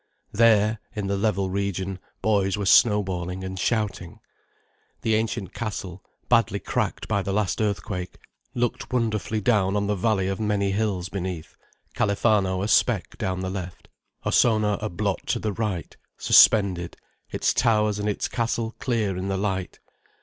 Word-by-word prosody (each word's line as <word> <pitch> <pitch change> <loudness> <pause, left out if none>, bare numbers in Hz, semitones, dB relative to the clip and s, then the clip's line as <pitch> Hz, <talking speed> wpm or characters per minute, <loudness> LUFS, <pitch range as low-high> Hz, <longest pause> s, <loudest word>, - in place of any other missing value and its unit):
There, 110 -1 +4 0.2
in 105 -2 -3
the 100 0 -1
level 100 -2 0
region, 95 -1 -2 0.2
boys 100 -3 +2
were 100 - -2
snowballing 95 -3 +3
and 95 0 -5
shouting. 100 -6 -2 0.8
The 110 - +2
ancient 110 -3 -1
castle, 100 -5 -5 0.2
badly 115 -4 +3
cracked - - -2
by 100 -2 +1
the 100 - -3
last 100 0 0
earthquake, 90 -3 -3 0.4
looked 120 +1 -2
wonderfully 110 -3 -1
down 105 -3 +2
on 100 0 +1
the 105 - 0
valley 100 -1 +1
of 95 +1 -2
many 105 -2 0
hills 100 -3 -1
beneath, 90 -4 -5 0.4
Califano 100 -2 +1
a - - -1
speck 110 - +2
down 95 0 -2
the 95 0 -3
left, 90 -2 -7 0.4
Ossona 110 -3 +3
a 110 - -2
blot 100 +1 -2
to - - +1
the 105 -2 -2
right, 100 -7 -3 0.2
suspended, 90 -5 +4 0.3
its - - 0
towers 105 -2 +2
and 105 +1 -1
its 105 - -1
castle 115 -1 -2
clear 110 -7 0
in 95 +1 -4
the 95 -1 -1
light. 95 -2 -3
100 Hz, 150 wpm, -25 LUFS, 95-110 Hz, 0.8 s, There